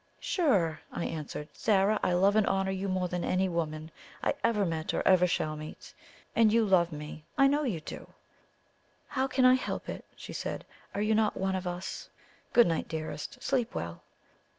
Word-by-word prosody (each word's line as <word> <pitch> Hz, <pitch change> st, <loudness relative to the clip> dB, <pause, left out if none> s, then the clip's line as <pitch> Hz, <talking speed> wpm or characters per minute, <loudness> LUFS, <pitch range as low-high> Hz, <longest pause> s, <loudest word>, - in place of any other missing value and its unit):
"Sure!" 195 Hz, -, +1 dB
I -, -, -3 dB
answered. 150 Hz, -1 st, -5 dB
"Zara, 210 Hz, 0 st, +3 dB
I 180 Hz, -, +2 dB
love 195 Hz, +3 st, +4 dB
and 215 Hz, -2 st, +4 dB
honour 195 Hz, 0 st, +1 dB
you 190 Hz, +1 st, -2 dB
more 185 Hz, -1 st, 0 dB
than 180 Hz, 0 st, -3 dB
any 185 Hz, +1 st, +1 dB
woman 160 Hz, -2 st, -3 dB, 0.3 s
I -, -, +2 dB
ever 210 Hz, -3 st, +2 dB
met 160 Hz, -2 st, -2 dB
or -, -, 0 dB
ever 180 Hz, -1 st, +6 dB
shall 155 Hz, -3 st, -1 dB
meet. 155 Hz, 0 st, -9 dB, 0.4 s
And 225 Hz, -2 st, +5 dB
you 230 Hz, 0 st, +4 dB
love 175 Hz, -4 st, +4 dB
me 150 Hz, 0 st, -7 dB
I 275 Hz, -, +6 dB
know 285 Hz, +2 st, +3 dB
you 215 Hz, -, -1 dB
do!" -, -, -8 dB, 1.0 s
"How 265 Hz, 0 st, 0 dB
can 260 Hz, -1 st, +2 dB
I 255 Hz, -, +8 dB
help 255 Hz, -, -2 dB
it?" -, -, -5 dB
she -, -, -9 dB
said. -, -, -4 dB, 0.3 s
"Are 205 Hz, -, 0 dB
you 215 Hz, +1 st, +2 dB
not 215 Hz, -1 st, +2 dB
one 190 Hz, 0 st, 0 dB
of 185 Hz, -1 st, -3 dB
us? 175 Hz, +1 st, -5 dB, 0.4 s
Good 240 Hz, -, +7 dB
night, 165 Hz, -2 st, 0 dB
dearest! 155 Hz, -2 st, -5 dB
Sleep 245 Hz, -4 st, 0 dB
well!" 85 Hz, 0 st, -4 dB
185 Hz, 190 wpm, -30 LUFS, 165-215 Hz, 1.0 s, I